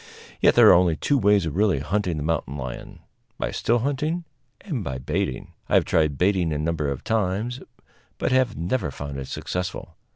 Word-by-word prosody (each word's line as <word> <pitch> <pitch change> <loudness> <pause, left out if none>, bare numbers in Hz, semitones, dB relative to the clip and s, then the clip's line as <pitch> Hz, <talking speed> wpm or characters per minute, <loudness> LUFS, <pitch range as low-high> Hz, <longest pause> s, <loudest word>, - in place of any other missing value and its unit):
Yet - - +4
there - - +8
are - - +9
only 85 -2 +4
two 140 - +1
ways 100 -4 +3
of 80 - -4
really 100 -3 +3
hunting 90 +3 -1
the 75 - -3
mountain 80 -2 -2
lion 65 -2 -7 0.4
by - - -2
still 120 - +1
hunting 150 +7 -1 0.4
and 145 - -4
by 65 -6 -4
baiting. 65 0 -3 0.2
I - - +3
have - - +4
tried 75 -4 +1
baiting 90 -3 +2
a 75 - -1
number 75 -1 -1
of 70 -2 -4
times, 110 +4 -1 0.6
but - - -1
have 130 -3 +2
never 85 +2 -1
found 70 0 -6
it 65 - -6
successful. 90 -2 -5
90 Hz, 190 wpm, -24 LUFS, 75-115 Hz, 0.6 s, are